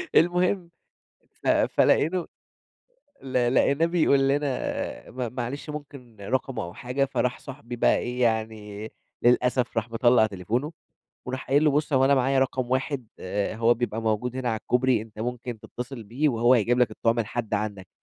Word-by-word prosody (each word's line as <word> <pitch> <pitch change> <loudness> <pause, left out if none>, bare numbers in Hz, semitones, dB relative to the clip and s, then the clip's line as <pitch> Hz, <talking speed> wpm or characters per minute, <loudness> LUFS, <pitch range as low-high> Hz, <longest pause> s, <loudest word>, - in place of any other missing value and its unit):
المهم، 180 +1 +3 0.7
ف - - -3
فلقيته 175 +3 +3 1.0
ل 125 -1 +1
لقيناه 140 +5 +3
بيقول 165 -5 +3
لنا: 140 -2 -2
"م 125 -2 -4
معلش 130 +4 -5
ممكن 140 -6 -9
رقمه 125 +2 -2
أو 85 - -7
حاجة." 125 +3 -1
فراح 125 -2 -1
صاحبي 130 -3 -8
بقى 120 - +3
إيه، 125 +1 -3
يعني 110 -2 -2 0.3
للأسف 125 0 +2
راح 115 0 0
مطلّع 120 -1 +4
تليفونه 110 - -2 0.6
وراح 130 +1 -5
قايل 145 +3 +4
له: 150 - +5
"بُص، 145 +1 0
هو 130 -1 +4
أنا 140 +1 +5
معايا 135 +1 +2
رقم 130 -1 0
واحد 130 -1 -1 0.5
هو 115 +2 +3
بيبقى 115 -1 -3
موجود 115 +3 -1
هنا 130 -2 -2
على 110 - -1
الكوبري، 125 -2 +2
أنت 110 -1 -15
ممكن 120 0 -4
تتّصل 125 +1 -7
بيه 125 +9 0
وهو 120 -1 +4
هيجيب 120 +1 +2
لك 125 - +3
الطُعم 115 +1 0
لحد 115 0 -3
عندك." 100 -3 -3
125 Hz, 155 wpm, -26 LUFS, 115-135 Hz, 1.0 s, له